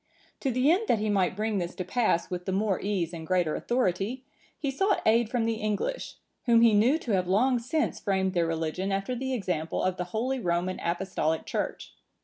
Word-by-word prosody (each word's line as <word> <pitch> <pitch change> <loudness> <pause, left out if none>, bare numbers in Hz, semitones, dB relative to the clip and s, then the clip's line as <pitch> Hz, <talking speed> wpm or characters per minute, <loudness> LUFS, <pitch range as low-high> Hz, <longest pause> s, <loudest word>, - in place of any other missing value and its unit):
To 270 - -1
the 255 +4 +3
end 410 +6 +1
that - - +3
he 210 0 -1
might 190 -3 +1
bring 215 0 -1
this 175 -1 -4
to 185 - -4
pass 205 -4 +1
with 180 0 -4
the 190 - -1
more 195 0 +1
ease 185 -4 -1
and 160 -1 -7
greater 180 -4 +1
authority, 240 +1 -1 0.3
he 280 -2 -2
sought 390 +8 +1
aid 225 0 +4
from 240 -2 0
the 225 -1 0
English, 215 - -2 0.3
whom 230 -1 +6
he 230 -2 +6
knew 235 +9 +4
to 255 -8 -5
have 185 -3 +1
long 245 +7 +3
since 295 +7 -1
framed 190 -2 0
their 170 -2 +1
religion 165 +4 -2
after 195 +5 -1
the 260 +2 -3
example 180 -7 -2
of 185 0 0
the 180 - -2
holy 240 +8 -2
Roman 180 -2 -1
Apostolic 170 -2 -1
Church. - - -4
205 Hz, 205 wpm, -28 LUFS, 180-240 Hz, 0.3 s, whom